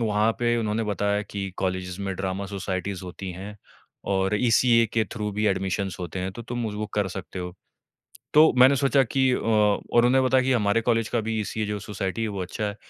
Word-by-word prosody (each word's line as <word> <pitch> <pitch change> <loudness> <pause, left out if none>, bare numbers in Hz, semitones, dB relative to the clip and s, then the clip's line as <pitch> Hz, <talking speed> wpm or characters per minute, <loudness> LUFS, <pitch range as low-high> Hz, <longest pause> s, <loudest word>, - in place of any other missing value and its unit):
वहाँ 110 0 +2
पे 120 0 +2
उन्होंने 110 0 -1
बताया 105 0 0
कि, 100 -2 -5
"कॉलेजेज़ 95 0 -3
में 100 -1 -3
ड्रामा 95 +1 -3
सोसाइटीज़ 95 -1 -4
होती 90 +1 -7
हैं, 100 +4 -8 0.5
और 95 0 0
ईसीए 115 -1 +4
के 110 -1 +2
थ्रू 105 -2 -3
भी 105 +2 0
एडमिशंस 95 -1 -1
होते 90 +1 -5
हैं, 95 +1 -3
तो 120 - -8
तुम 120 0 -3
उज़ 105 -1 -5
वो 105 0 -3
कर 105 -2 +1
सकते 95 0 -7
हो।" 90 -1 -5 0.8
तो 155 +1 +7
मैंने 130 +2 +7
सोचा 135 0 +3
कि 130 +2 +1
अ, - - +2
और 110 +1 +2
उन्होंने 130 +2 +4
बताया 130 0 +3
कि, 130 - +2
"हमारे 110 -2 +2
कॉलेज 115 -1 +1
का 120 - 0
भी 110 0 -2
ईसीए 105 +1 -3
जो 105 0 -3
सोसाइटी 100 0 -4
है, 110 - -1
वो 100 -3 -4
अच्छा 95 +4 -4
है।" 105 0 -4
105 Hz, 215 wpm, -25 LUFS, 95-115 Hz, 0.8 s, तो